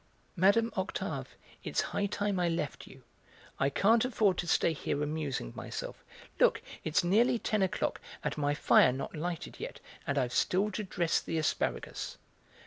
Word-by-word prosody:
Mme. 200 +5 +4
Octave, 190 0 -3 0.3
it's - - -1
high 205 - -1
time 200 -1 -1
I 175 -1 +2
left 165 -3 -3
you; - - -14 0.6
I 135 - +3
can't 220 +10 +4
afford 215 -7 +2
to 175 - -2
stay 165 - +3
here 145 -1 -2
amusing 145 - -3
myself; - - -6 0.4
look, - - +5 0.2
it's 160 +3 +2
nearly 235 +8 +4
ten 215 -2 0
o'clock 190 -2 0 0.2
and - - -1
my 145 -1 0
fire 130 - +5
not 130 +5 -5
lighted 170 +1 -4
yet, - - -6 0.3
and 140 - 0
I've 125 -3 0
still 200 +3 +2
to 215 - -3
dress 175 -3 0
the 165 - -3
asparagus." 100 - -2
175 Hz, 160 wpm, -31 LUFS, 150-205 Hz, 0.6 s, look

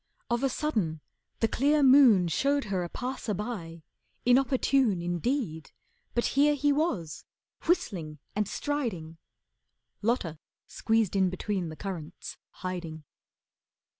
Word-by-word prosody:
Of 240 0 +1
a 270 - +2
sudden, 215 - -1 0.4
the 225 - +4
clear 285 +6 +2
moon 255 -9 +7
Showed 280 - +1
her 180 -2 0
a 175 - -5
passer 250 -3 -4
by, 175 -6 -6 0.4
inopportune 255 -4 +3
Indeed, 175 - -2 0.5
but 240 - +1
here 290 +2 +4
he 290 +1 +2
was, 235 - -1 0.4
whistling 175 - 0 0.2
and 210 -1 0
striding. 200 - -3 0.8
Lotta 205 -9 -1 0.3
squeezed 225 -4 0
in 190 -1 +3
between 185 -1 -3
the 155 - -7
currants, 175 -3 -7
hiding. 175 -4 -6
210 Hz, 115 wpm, -28 LUFS, 170-270 Hz, 0.8 s, moon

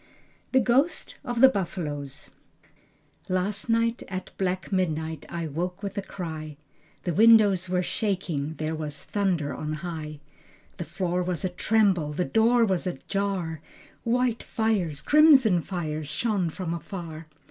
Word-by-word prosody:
The 260 - +5
Ghosts 265 +7 +2
of 240 -3 -2
the 265 - +11
Buffaloes 150 - -4 1.0
Last 195 +4 -1
night 230 +1 +2
at 185 -1 -6
black 185 0 -2
midnight 160 -4 -1
I 170 -1 -3
woke 180 +6 -4
with 200 -1 -4
a 200 - -1
cry, 160 -6 -6 0.5
The 175 - -1
windows 205 -3 +5
were 180 0 +1
shaking, 175 -8 -2
there 155 0 -3
was 150 -3 -5
thunder 180 -8 0
on 155 0 -4
high, 155 -3 -5 0.6
The 170 - -4
floor 180 0 -1
was 180 +1 -2
a - - +1
tremble, 180 -5 +2
the 180 +4 0
door 230 +1 +4
was 190 -3 0
a 180 - -3
jar, 190 -6 -2 0.4
White 240 0 +1
fires, 190 -10 -1
crimson 275 - +6
fires, 155 -4 -4
shone 190 +2 0
from 170 0 -4
afar. 165 -2 -7
180 Hz, 140 wpm, -26 LUFS, 160-210 Hz, 1.0 s, the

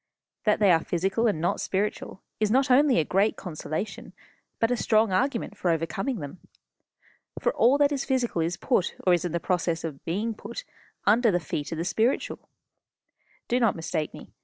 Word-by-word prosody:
That 210 - +4
they 205 -3 +5
are 165 -1 +3
physical 195 +7 0
and 205 -8 0
not 170 - 0
spiritual 195 -1 -3 0.2
is 215 -1 +2
not 265 +4 +3
only 275 0 +5
a 160 - +2
great 195 +6 +2
consolation, 165 +2 -5 0.4
but 225 +1 +1
a - - +3
strong 220 -3 +2
argument 230 +1 0
for 185 - -1
overcoming 170 - -1
them. 145 +5 -8 1.0
For - - 0
all 255 +4 +4
that 285 0 +3
is 275 -2 -1
physical 250 -10 0
is 170 +2 -1
put, 240 -8 0
or 180 - +5
is 175 -1 +1
in 175 - -2
the 170 - -1
process 170 -2 -1
of 155 -4 -6
being 210 +7 -2
put, - - -8 0.4
under 225 +3 +4
the 175 -3 +2
feet 150 -1 -4
of 165 - -3
the 165 - -2
spiritual. 225 +7 -1 1.0
Do 245 - +1
not 230 -4 +3
mistake 160 -2 -3
me. - - -12
200 Hz, 185 wpm, -26 LUFS, 170-235 Hz, 1.0 s, they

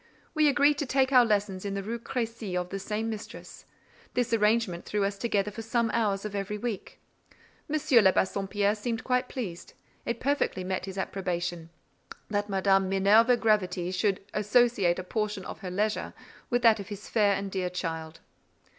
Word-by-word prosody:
We 310 -2 +4
agreed 285 +1 +3
to 290 - -2
take 265 0 +2
our 250 -2 +7
lessons 205 -4 0
in 200 -1 -3
the 195 - -3
Rue 230 +4 -4
Crécy 230 -6 -3
of 180 0 -5
the 195 - -4
same 210 +3 -3
mistress; 220 -2 -8 0.5
this 245 -1 0
arrangement 210 -5 +2
threw 205 -1 -1
us 200 0 0
together 210 -1 -1
for 225 - -7
some 230 0 0
hours 205 -3 0
of 210 - -5
every 205 +1 -3
week. 220 -2 -5 0.7
M. 305 - -1
de 245 -10 +5
Bassompierre 200 +2 0
seemed 225 +1 -3
quite 250 0 0
pleased: 195 -10 -6 0.3
it 235 - -3
perfectly 275 -9 0
met 185 0 -2
his 190 0 -7
approbation, 175 -3 -3 0.6
that 205 0 -1
Madame 195 -1 +2
Minerva 210 +6 +5
Gravity 185 -6 +1
should 190 +1 0
associate 210 -4 +3
a 185 - -4
portion 210 0 -3
of - - -7
her 190 - -6
leisure 210 +4 -1 0.3
with 245 -1 +1
that 225 -2 +6
of 200 - -7
his 205 -1 -8
fair 205 -3 +3
and 195 0 -4
dear 185 -2 -1
child. 165 -2 -5
205 Hz, 175 wpm, -28 LUFS, 190-230 Hz, 0.7 s, our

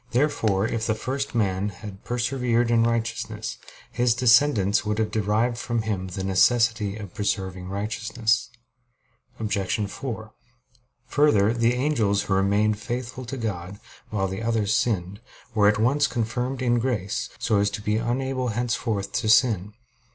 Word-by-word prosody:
Therefore, 115 -7 +2
if 115 -1 -2
the 110 - +1
first 135 +4 -3
man 100 -2 +1
had 100 -1 -10
persevered 120 -1 0
in 115 -1 +4
righteousness, 115 -1 -2 0.3
his 120 -1 +2
descendants 120 -5 +4
would 105 0 -1
have 110 -1 0
derived 110 +3 0
from 115 -2 -1
him 100 -4 -2
the 95 +1 -5
necessity 105 +1 +2
of 100 -4 -9
preserving 95 -3 -2
righteousness. 110 +4 -1 0.9
Obj. 100 -2 -1
4: 110 0 -6 0.7
Further, 125 -7 +3
the 120 +1 +2
angels 120 -7 +1
who 95 - -1
remained 100 +2 +2
faithful 125 +3 -5
to 135 +3 -5
God, 100 -4 -4 0.3
while 100 -3 -1
the 95 +2 -5
others 110 -2 0
sinned, 100 -2 -1 0.3
were 105 -2 +4
at 105 - +4
once 135 +6 +3
confirmed 125 +2 -2
in 120 -1 +2
grace, 110 -6 -2
so 105 - +1
as 100 0 +2
to 105 - -6
be 105 0 +1
unable 130 +2 -1
henceforth 115 -3 -2
to 110 -1 -1
sin. 105 -3 +3
110 Hz, 145 wpm, -25 LUFS, 100-120 Hz, 0.9 s, in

